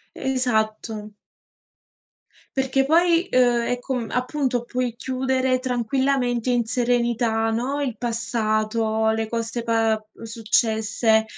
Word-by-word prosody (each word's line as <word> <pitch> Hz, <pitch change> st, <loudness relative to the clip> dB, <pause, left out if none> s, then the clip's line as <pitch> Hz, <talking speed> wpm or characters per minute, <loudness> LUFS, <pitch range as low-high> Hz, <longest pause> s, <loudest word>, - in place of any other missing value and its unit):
Esatto. 220 Hz, -4 st, -1 dB, 1.4 s
Perché 265 Hz, 0 st, +2 dB
poi, 335 Hz, +3 st, +3 dB
uhm, 245 Hz, -2 st, +4 dB
è 245 Hz, +1 st, -1 dB
com 245 Hz, -2 st, -3 dB
appunto 255 Hz, 0 st, -1 dB
puoi 250 Hz, -1 st, -2 dB
chiudere 260 Hz, +1 st, 0 dB
tranquillamente 250 Hz, 0 st, 0 dB
in 240 Hz, -2 st, +1 dB
serenità, 235 Hz, -1 st, +1 dB
no, 250 Hz, +6 st, -1 dB
il 260 Hz, -5 st, -2 dB
passato, 220 Hz, -1 st, 0 dB
le 220 Hz, 0 st, 0 dB
cose 230 Hz, +1 st, -3 dB
pa 225 Hz, -1 st, +2 dB, 0.2 s
uhm, -, -, -16 dB
successe. 220 Hz, 0 st, +1 dB
240 Hz, 105 wpm, -23 LUFS, 225-255 Hz, 1.4 s, uhm